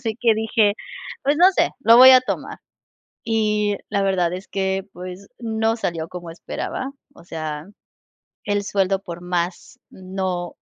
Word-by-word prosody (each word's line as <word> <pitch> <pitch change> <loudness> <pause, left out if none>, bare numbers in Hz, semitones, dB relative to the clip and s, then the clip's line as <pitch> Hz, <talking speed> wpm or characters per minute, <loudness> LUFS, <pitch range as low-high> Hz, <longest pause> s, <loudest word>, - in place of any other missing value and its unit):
Así 225 -2 -3
que 235 -2 +4
dije: 220 -1 +2 0.5
"Pues 285 +2 +2
no 350 +4 +7
sé, - - +2
lo 230 -3 +6
voy 260 +2 +10
a 255 -1 +8
tomar". 255 - -5 0.7
Y 210 -2 +1
la 200 - 0
verdad 185 -3 +1
es 185 +2 -7
que, 190 0 -1
pues, 185 +2 -9
no 225 -1 0
salió 165 -7 -3
como 175 -2 -8
esperaba, 260 +9 -5 0.2
o 170 - -16
sea, 155 -2 -6 0.8
el 205 0 0
sueldo 195 -1 0
por 175 -3 -8
más, 175 0 -3
no, 185 -2 -4
195 Hz, 150 wpm, -22 LUFS, 180-225 Hz, 0.8 s, voy